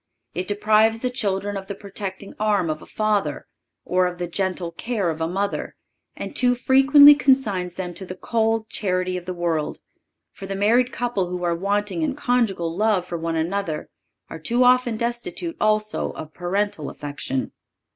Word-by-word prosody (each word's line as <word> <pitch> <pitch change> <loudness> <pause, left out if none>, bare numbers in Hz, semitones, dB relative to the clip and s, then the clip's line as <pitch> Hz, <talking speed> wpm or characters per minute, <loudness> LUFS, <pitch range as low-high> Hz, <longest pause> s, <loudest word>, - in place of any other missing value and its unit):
It 180 +3 -3
deprives 215 +2 +3
the 250 +2 -2
children 205 -4 -1
of 195 -1 -5
the 200 - -5
protecting 200 -1 -7
arm 205 -6 +2
of 155 - -5
a - - -13
father, 215 -2 -1 0.4
or 180 0 +2
of 180 0 -5
the 175 - -2
gentle 180 -1 -2
care 200 -1 -1
of 160 0 -6
a 160 - +1
mother, 200 +3 -2 0.4
and - - -7
too 245 -1 +3
frequently 270 +3 +8
consigns 220 - +1
them 180 -2 -4
to 190 - -6
the 185 - -6
cold 225 +2 0
charity 185 -3 -1
of 180 -1 -5
the 185 - -3
world; 165 -3 -1 0.5
for 195 - -9
the 195 - -3
married 235 +5 +3
couple 235 -7 -1
who 180 0 -4
are 170 -1 +1
wanting 205 - -1
in 300 -4 0
conjugal 220 - 0
love 205 -2 +2
for 175 - -5
one 165 0 -2
another 165 0 -2 0.4
are 165 - -8
too 240 +10 +2
often 250 -2 +4
destitute 240 +9 -3
also 215 0 +1
of 155 0 -9
parental 185 -3 -2
affection. 140 -2 -4
200 Hz, 175 wpm, -23 LUFS, 180-225 Hz, 0.5 s, frequently